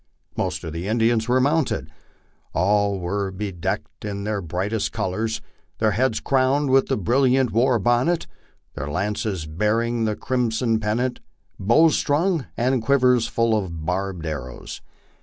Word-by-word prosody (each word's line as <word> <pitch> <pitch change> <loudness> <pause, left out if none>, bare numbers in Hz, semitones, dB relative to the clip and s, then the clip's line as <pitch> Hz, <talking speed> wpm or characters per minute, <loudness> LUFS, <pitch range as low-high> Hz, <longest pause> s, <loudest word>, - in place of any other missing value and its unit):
Most - - -2
of 80 - -5
the 85 +3 -4
Indians 115 +1 +2
were 125 +1 +3
mounted; 145 +3 0 0.6
all 100 +2 +2
were 95 +3 -2
bedecked 95 -5 -4
in 100 -1 -4
their 105 -1 -2
brightest 95 +6 -2
colors, 110 +1 -2 0.4
their 110 -1 +2
heads 115 +2 +1
crowned 135 +1 +2
with 135 0 +4
the - - 0
brilliant 130 +4 +2
war 120 +2 +3
bonnet, 120 - +1 0.5
their 75 - -5
lances 100 +1 -2
bearing 110 +8 0
the 105 -1 0
crimson 115 -2 0
pennant, 120 +4 -1 0.4
bows 145 +11 +4
strung, 160 0 +1
and 125 +1 +1
quivers 125 -2 +3
full 115 -1 +1
of 85 -7 -3
barbed 90 -1 -2
arrows. 70 -5 -6
110 Hz, 140 wpm, -23 LUFS, 95-125 Hz, 0.6 s, with